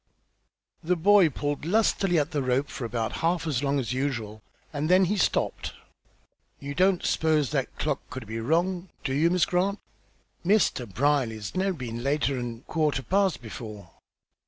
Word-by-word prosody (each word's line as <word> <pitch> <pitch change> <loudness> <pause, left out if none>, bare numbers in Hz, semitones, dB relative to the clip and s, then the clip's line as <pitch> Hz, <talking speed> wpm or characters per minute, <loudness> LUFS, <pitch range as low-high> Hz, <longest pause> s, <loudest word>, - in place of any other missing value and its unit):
The 180 +3 +2
boy 190 0 +5
pulled 145 +1 -3
lustily 195 -1 +2
at 150 +2 +1
the 145 -2 0
rope 130 +2 0
for 125 - -5
about 115 -1 -2
half 165 0 +1
as 140 -6 0
long 140 0 +1
as 125 -1 -2
usual, 115 -6 -3 0.3
and 150 +2 -2
then 185 +1 +6
he 200 +4 0
stopped. 195 - 0 0.9
"You 140 0 -5
don't 185 +4 +2
s'pose 155 -4 +2
that - - -2
clock - - -1
c'ud 130 -3 -6
be 110 +2 -5
wrong, 175 +8 0
do 130 - -1
yo', 155 +5 +3
Miss 180 -2 +3
Grant? 190 +3 0 0.7
Mr. 175 - +2
Brierly's 115 -3 0
never 190 +1 0
been 120 -3 -5
later'n 125 -4 -1
quarter 150 -4 0
past 190 -7 +1
before." 105 -5 -8
145 Hz, 160 wpm, -27 LUFS, 125-180 Hz, 0.9 s, then